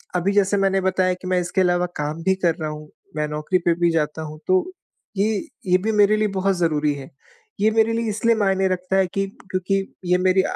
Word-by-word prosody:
अभी 180 +3 +1
जैसे 205 0 +2
मैंने 195 0 +2
बताया 185 0 +1
कि 185 0 -9
मैं 185 -1 +2
इसके 180 +2 0
अलावा 175 0 +2
काम 150 +2 -3
भी 190 0 +2
कर 170 -1 +3
रहा 155 -3 -4
हूँ, 150 0 -8 0.3
मैं 150 0 -1
नौकरी 150 +5 -1
पे 170 - +4
भी 170 0 +3
जाता 160 -1 -1
हूँ। 155 0 -8
तो 370 -1 +3 0.5
ये 215 +2 +2 0.3
ये 180 0 +5
भी 215 +4 -1
मेरे 210 0 +4
लिए 215 0 +1
बहुत 195 0 +1
ज़रूरी 150 -3 +1
है। 135 -1 -9 0.5
ये 215 +2 +3
मेरे 225 +1 +2
लिए 230 -1 -1
इसलिए 230 +2 +2
मायने 195 -2 +1
रखता 185 +1 -2
है 190 -1 +3
कि 195 0 0 0.2
क्योंकि 195 +1 -1 0.2
ये 180 +1 +3
मेरी 185 +1 +3
185 Hz, 220 wpm, -22 LUFS, 170-195 Hz, 0.5 s, ये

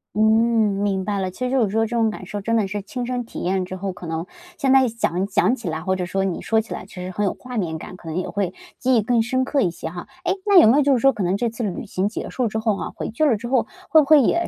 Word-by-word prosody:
嗯， 210 - +1 0.6
明 195 -2 0
白 205 0 -1
了， 190 -1 -1
其 220 +8 -5
实 250 - -2
就 265 -2 +3
是 210 - 0
说 225 +3 +1
这 235 +2 -4
种 225 -1 +3
感 215 - -7
受 205 -1 -5
真 230 +3 0
的 215 -3 +2
是 205 +1 -4
亲 245 +5 -5
身 250 0 -2
体 - - -8
验 185 +1 0
之 185 - -6
后， 190 +1 -3
可 180 - -9
能 165 +1 -3 0.3
现 275 -5 +1
在 265 -1 +6
想 195 -5 -1
想 195 +3 +2
起 230 -9 -5
来， 160 0 -3
或 190 +2 0
者 180 -1 -2
说 195 +1 -1
你 190 -3 -2
说 225 - +2
起 220 - -5
来 - - -6
其 - - -17
实 180 0 -5
很 205 +3 -2
有 195 - 0
画 250 0 -8
面 165 -6 -1
感， 170 - -9
可 170 - -14
能 160 - -3
也 185 - -2
会 195 -3 -2 0.3
记 260 0 +2
忆 225 - +4
更 235 +1 +2
深 260 +3 0
刻 280 +1 +1
一 185 - +2
些 165 -1 -6
哈。 175 +1 -8 0.2
诶， 360 0 +1
那 400 -3 +7
有 330 - +7
没 240 +6 +5
有 295 - +5
就 280 -1 +3
是 250 - +2
说 270 +3 +4
可 210 - -5
能 185 +3 +1
这 240 +1 0
次 230 +2 -7
旅 200 -1 -3
行 190 -1 -1
结 220 - -5
束 250 -2 0
之 220 - -3
后 220 -2 0
哈， - - -5
回 - - -4
劲 300 +8 +1
儿 280 - +4
了 220 - +2
之 240 - -6
后 255 -1 +1 0.2
会 315 - +7
不 - - -1
会 300 0 +7
也 340 +7 +1
215 Hz, 350 characters per minute, -22 LUFS, 185-250 Hz, 0.6 s, 那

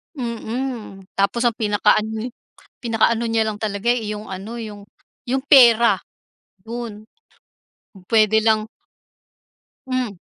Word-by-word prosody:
Mm, 235 -4 -5
tapos 200 +5 +1
ang 240 -2 +2
pinaka-ano 215 +2 +1
eh, - - -20 0.5
pinaka-ano 230 0 +2
niya 225 -1 +1
lang 215 -1 -3
talaga, 215 +2 0
eh, 225 -4 -3
yung 210 +1 -8
ano, 195 +5 -7
yung 210 -3 -7 0.5
yung 265 +2 0
pera, 235 -7 +6 0.7
'yon. 225 -2 -6 0.9
Kung 190 -2 -16
puwede 220 0 +4
lang 220 -1 +2 1.2
Hmm. 255 -6 -2
220 Hz, 115 wpm, -21 LUFS, 210-235 Hz, 1.2 s, pera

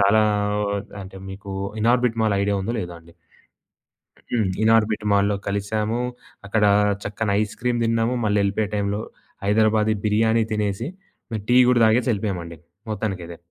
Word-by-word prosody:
చాలా 100 +2 +5 0.4
ఓ - - -2 0.4
అంటే, 95 0 -11
మీకు 100 +1 -8 0.3
ఇనార్బిట్ 120 0 +2
మాల్ 105 -2 +2
ఐడియా 100 0 +1
ఉందో, 115 +4 -2
లేదో 85 -3 -6
అండి. 85 0 -19 1.2
హ్మ్. 110 -5 +1
ఇనార్బిట్ 110 -1 +3
మాల్లో 100 0 +3
కలిసాము. 105 +3 -1 0.5
అక్కడ 105 +1 +1 0.4
చక్కన 105 +1 -3
ఐస్ 105 0 -2
క్రీమ్ 120 -1 0
తిన్నాము, 115 +1 +1
మళ్ళీ 105 0 +2
వెళ్ళిపోయే 100 +1 0
టైంలో 100 0 -1 0.4
హైదరాబాది 110 +1 +3
బిర్యానీ 110 +2 +3
తినేసి, 105 +2 -1 0.6
టీ 125 - +4
గూడా 125 -1 +4
తాగేసి 115 +3 +3
ఎళ్ళిపోయామండి 90 -5 -3 0.3
మొత్తానికైదే. 95 -5 -4
105 Hz, 135 wpm, -23 LUFS, 100-110 Hz, 1.2 s, చాలా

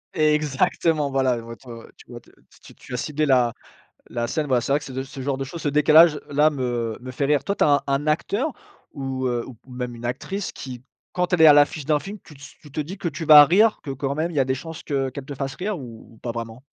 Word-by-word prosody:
Exactement! 150 0 +1
Voilà, 135 -1 +1
elles 115 - -6
vont 115 0 -9
être 130 - -17
ouais, 115 -1 -10
ouais, - - -18
tu - - -17
vois - - -8
te - - -24 0.3
tu - - -16
tu - - -12
as - - -1
ciblé 150 +4 -1
la 125 -4 +3 0.6
la 120 0 -2
scène, 155 +5 -2
voilà, 130 -3 +2
c'est 130 - -3
vrai 145 - +3
que 145 - -11
c'est 135 - -9
ce 130 - -3
g - - -7
ce 135 - -9
genre 135 0 -2
de 135 - -3
choses, 165 +5 -8
ce 150 - 0
décalage-là, 150 0 +4
me 120 -5 -3
me 130 +1 -8
fait 130 - -3
rire. 145 -1 +2
Toi 200 - -1
tu - - +1
as - - +4
un - - -1
un 140 +2 -1
acteur 205 - 0 0.4
ou 135 -2 -4
heu, 120 -1 -2
ou 130 - -10 0.2
même 125 -1 -5
une 115 - -12
actrice, 180 +11 -4
qui, 125 -2 -9 0.3
quand 180 0 -1
elle 175 -3 +2
est 160 - +9
à 150 - +9
l'affiche 145 0 +3
d'un 150 -1 +2
film 200 +6 -8
tu 150 -6 -15
se 140 - -13
tu 150 - -15
te 155 - -2
dis 175 +7 -7
que 185 - -4
tu 165 0 -5
vas 150 -2 +9
rire, 210 +8 +3
que 140 - -5
quand 135 +1 -3
même 160 +2 -1
il - - -9
y - - +4
a - - +1
des 130 0 -1
chances 160 +4 -8
que 135 -2 -1
qu'elle 135 +1 -8
te 145 - -7
fasse 135 0 -4
rire, 195 -2 -3
ou 115 -2 -12
ou - - -21
pas 120 +1 -5
vraiment? 115 +1 -7
140 Hz, 285 wpm, -23 LUFS, 130-155 Hz, 0.6 s, est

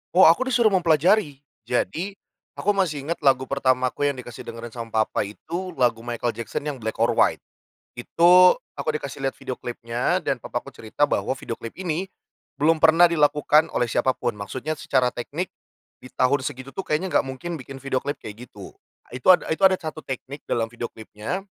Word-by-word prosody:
Oh 190 - +8
aku 170 +11 +6
disuruh 240 -4 +3
mempelajari. 165 -3 +2 0.2
Jadi, 180 +10 -1 0.4
aku 205 - +1
masih 165 -8 -1
inget 170 +3 -3
lagu 135 -3 +3
pertamaku 130 +1 +1
yang 140 - 0
dikasih 120 -2 -9
dengerin 115 0 -7
sama 115 -2 -1
papa 105 - -2
itu 170 - -6
lagu 120 -2 +2
Michael 120 0 -2
Jackson 115 +4 -5
yang 145 -3 -4
"Black 110 0 -4
or - - +2
White." - - +2 0.6
Itu 180 +7 +6 0.2
aku - - -4
dikasih 140 -2 -5
lihat 135 - -1
video 130 - -6
klipnya 120 0 -2
dan - - -1
papa - - -4
aku - - -11
cerita - - -1
bahwa - - 0
video - - -6
klip 115 - -8
ini, 180 0 -3 0.5
belum 155 +3 +2
pernah 165 +2 +6
dilakukan 150 0 +3
oleh 120 -2 0
siapapun. 130 -4 0
Maksudnya 130 +9 -4
secara 125 -2 +1
teknik, 150 +10 -5 0.5
di - - -14
tahun 130 +2 +1
segitu 130 +2 -6
tuh 190 +7 -6
kayaknya 170 +5 -1
enggak - - 0
mungkin 160 +5 -5
bikin 135 +1 -10
video 135 -1 0
klip 145 +3 -4
kayak 110 +4 -9
gitu. - - -11 0.4
Itu 125 0 -9
ada - - -3
itu 160 - -1
ada 190 - +5
satu 155 -3 -7
teknik 135 +2 -7
dalam 115 -1 -1
video 120 0 -5
klipnya 110 - -6
140 Hz, 185 wpm, -24 LUFS, 120-165 Hz, 0.6 s, Oh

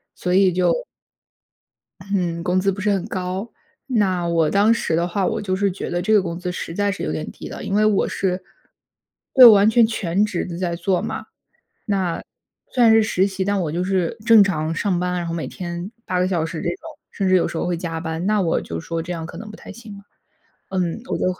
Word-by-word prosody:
所 180 - -2
以 190 -1 +5
就 185 - +1 1.3
嗯， 170 -3 -1
工 180 +1 +1
资 195 +1 +1
不 190 - -7
是 210 +2 +1
很 195 -3 0
高。 185 +4 -4 0.4
那 195 -9 +1
我 165 -2 +2
当 205 +3 +4
时 230 -8 -1
的 170 +1 +1
话， 185 +2 -1
我 - - -2
就 185 -2 -1
是 200 0 +1
觉 185 - -5
得 175 - -1
这 200 +5 0
个 210 - +5
工 170 -2 -4
资， 180 0 -4
实 165 - -5
在 205 +2 +1
是 - - -6
有 - - -2
点 80 -1 -4
低 - - -9
的， - - -8
因 195 - -3
为 215 +1 +3
我 210 -2 +2
是 185 -1 -2 0.9
对， 260 - +9
完 210 -2 +8
全 230 0 +5
全 200 -3 0
职 200 -5 -2
地 170 -1 -6
在 175 -2 -2
做 180 +1 0
嘛， - - -5 0.6
那 190 -5 -1 0.5
虽 250 - +2
然 225 -1 +7
是 225 - +6
实 195 -3 +1
习， 190 -1 -3
但 200 0 0
我 155 - -3
就 175 +2 -1
是 185 0 0
正 225 -3 +8
常 160 -4 -1
上 180 0 0
班， 180 0 -1
然 175 -1 -2
后 165 - -3
每 165 - -4
天 175 +2 -6 0.2
8 180 -1 0
个 185 - +2
小 175 -4 0
时 165 0 -6
这 - - -2
种。 175 - -2 0.4
甚 195 -2 -1
至 185 - +4
有 180 - +2
时 - - -6
候 - - -1
会 175 -1 -1
加 165 -1 -4
班， 160 +1 -4
那 210 -1 +2
我 165 -3 +1
就 85 0 -6
说 165 - -4
这 180 +2 -5
样 165 -1 -5
可 - - -10
能 215 -1 -8
不 210 - -10
太 - - -12
行 225 -3 -11
了。 200 - -15 0.7
嗯， 180 0 -1
我 - - -2
就 - - -1
185 Hz, 255 characters per minute, -21 LUFS, 170-200 Hz, 1.3 s, 对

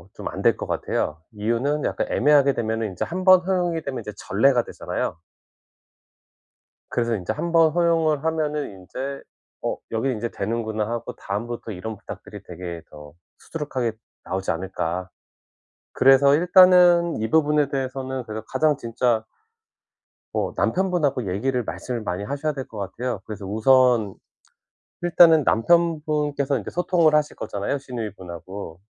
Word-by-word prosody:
좀 - - -6
안 - - -6
될 - - +4
것 - - -5
같아요. 80 +1 -2
이유는 120 +8 -1
약간 - - -1
애매하게 140 0 +4
되면은 110 -1 -2
인제 90 - -3
1 185 +2 -4
번 185 -1 +8
허용이 175 -3 0
되면 135 -4 -4
이제 105 - -7
전례가 120 +6 +2
되잖아요. - - -4 1.7
그래서 115 -1 0
인제 100 +2 -3
1 170 +9 -3
번 165 -2 +5
허용을 165 -3 +2
하면은 155 -2 -1
인제 130 +9 -7 0.4
'어 - - -1
여기 115 +4 0
인제 120 -1 -3
되는구나.' 110 0 -2
하고 120 0 -4
다음부터 115 +3 -5
이런 105 +4 -6
부탁들이 - - -10
되게 85 -1 -7
더 75 -1 -12 0.3
수두룩하게 130 -7 -3 0.3
나오지 95 +1 -2
않을까. 90 0 -3 0.8
그래서 135 +1 +5
일단은 180 0 +6
이 110 - -1
부분에 150 -2 +3
대해서는 130 -1 -3
그래서 110 0 -6
가장 150 +2 +2
진짜 115 -2 0 1.1
뭐 - - -1
남편 190 0 +1
분하고 135 - 0
얘기를 125 +5 -1
말씀을 120 +2 -5
많이 95 -1 -3
하셔야 145 +7 -2
될 135 -2 -6
것 110 - -11
같아요. 105 +2 -4
그래서 105 -2 -7
우선 110 0 +3 0.9
일단은 170 -3 +6
남편 165 +8 +3
분께서 145 -3 0
이제 100 - -7
소통을 175 -3 +2
하실 150 -1 +1
거잖아요, 105 +5 -3
시누이 120 -5 -5
분하고. 90 0 -9
130 Hz, 330 characters per minute, -23 LUFS, 110-150 Hz, 1.7 s, 번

